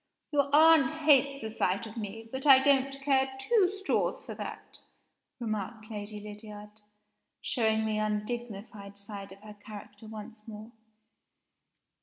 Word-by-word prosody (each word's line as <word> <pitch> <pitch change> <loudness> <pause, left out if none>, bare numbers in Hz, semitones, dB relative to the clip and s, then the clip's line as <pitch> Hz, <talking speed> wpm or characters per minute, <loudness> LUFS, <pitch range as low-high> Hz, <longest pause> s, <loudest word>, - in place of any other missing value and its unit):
Your 285 -2 +2
aunt 315 -2 +6
hates 280 -3 +4
the 220 - -4
sight 200 0 0
of 220 0 -10
me 225 0 -6
but 265 +2 -3
I 265 -1 +8
don't 275 -1 +4
care 265 -1 +2
two 390 - +3
straws 395 -1 -1
for - - -7
that," - - -8 0.6
remarked 215 0 -4
Lady 210 0 -6
Lydiard, 210 0 -10 0.7
showing 220 -3 +1
the 215 -1 0
undignified 210 -2 -4
side 200 -1 -8
of 195 - -17
her 215 -1 -10
character 210 0 -11
once 215 0 -10
more. 215 +1 -9
220 Hz, 135 wpm, -30 LUFS, 210-265 Hz, 0.7 s, I